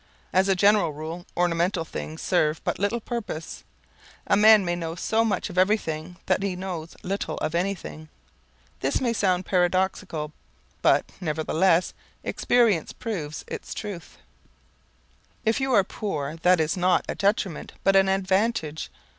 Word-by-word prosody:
As 190 +1 +4
a 195 - +4
general 200 -4 +4
rule 160 +4 -7
ornamental 175 0 +1
things 155 0 -6
serve 155 -4 +2
but - - -2
little 205 +4 0
purpose. 220 -9 -5 0.6
A - - +3
man 215 -1 +7
may 175 0 0
know 165 -1 -4
so 220 +5 +1
much 205 -5 0
of 180 - -1
everything 180 -4 0
that - - +1
he 195 -2 -1
knows 180 -3 -6
little 195 +2 -3
of 155 - -2
anything. 170 -3 -3 0.7
This 135 - 0
may 240 -3 0
sound 185 -4 +1
paradoxical, 180 -3 0 0.5
but, - - +4 0.2
nevertheless, 165 +2 +1 0.3
experience 230 -9 +2
proves 165 -10 -5
its - - -6
truth. 200 -6 -7 1.3
If 225 +4 +2
you 265 0 0
are 200 -4 +6
poor 160 -7 -4
that 180 +1 +4
is 160 +4 +1
not 180 0 +2
a - - -2
detriment 195 -4 -1
but 195 - +4
an 195 0 +5
advantage. 190 -4 0
185 Hz, 145 wpm, -25 LUFS, 165-200 Hz, 1.3 s, man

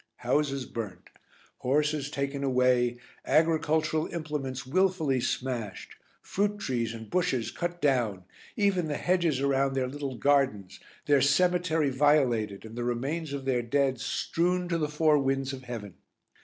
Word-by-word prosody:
Houses 140 -3 +1
burnt, 100 -8 -7 0.5
horses 150 +2 0
taken 140 -1 -3
away, 125 -2 +2 0.3
agricultural 160 -1 +2
implements 145 -5 -4
wilfully 160 -3 +1
smashed, 120 -6 -3 0.3
fruit 205 +1 -1
trees 120 - -2
and 110 -1 -8
bushes 150 - 0
cut 175 0 -4
down, 120 - +1 0.3
even 195 -5 +2
the 145 - -2
hedges 170 -7 +1
around 135 -1 +1
their 130 -1 0
little 140 0 -5
gardens, 130 -7 +1 0.3
their 145 -2 +4
cemetery 165 +1 +2
violated 125 -8 +2
and 110 +1 -10
the 120 - -3
remains 135 +6 -2
of 140 -1 -5
their 130 -2 +1
dead 130 +1 +1
strewn 180 +9 0
to 170 -1 0
the 150 -2 -1
four 150 0 +3
winds 135 0 0
of 130 -1 -8
heaven. 110 -6 -6
140 Hz, 140 wpm, -28 LUFS, 125-155 Hz, 0.5 s, their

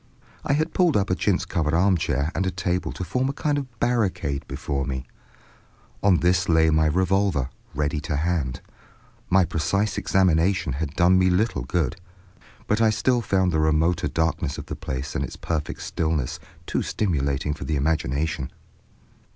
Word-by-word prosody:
I 145 - +1
had 155 +3 0
pulled 175 - +3
up 100 -2 0
a - - +3
chintz 95 -1 +1
covered 80 -2 0
armchair 85 -4 +2
and 95 - -1
a - - +2
table 90 0 -2
to - - -5
form 125 +9 -1
a - - -2
kind 145 0 0
of 125 -5 -9
barricade 100 - 0
before 70 0 -3
me. 65 -1 -4 1.0
On 95 -4 +4
this 90 +2 +2
lay 80 -1 +4
my 80 0 +3
revolver, 90 -4 +1 0.2
ready 75 +1 0
to 75 +1 -3
hand. 70 -4 -1 0.7
My 95 0 +5
precise 100 +7 0
examination 95 -4 +2
had 70 +2 -4
done 90 +1 +5
me 95 - +4
a - - +4
little 100 - +1
good, 80 +1 -1 0.7
but 110 +2 +1
I 110 - +5
still 120 +3 +1
found 95 -4 +1
the 80 - +1
remoter 80 +3 +2
darkness 80 -4 -1
of - - -6
the - - -5
place 65 +1 -5
and - - -1
its - - -6
perfect 80 -3 -3
stillness 80 -5 -1 0.3
too - - -1
stimulating 75 -7 -1
for 70 - -7
the 80 - -1
imagination. 75 -1 -1
85 Hz, 170 wpm, -24 LUFS, 75-95 Hz, 1.0 s, My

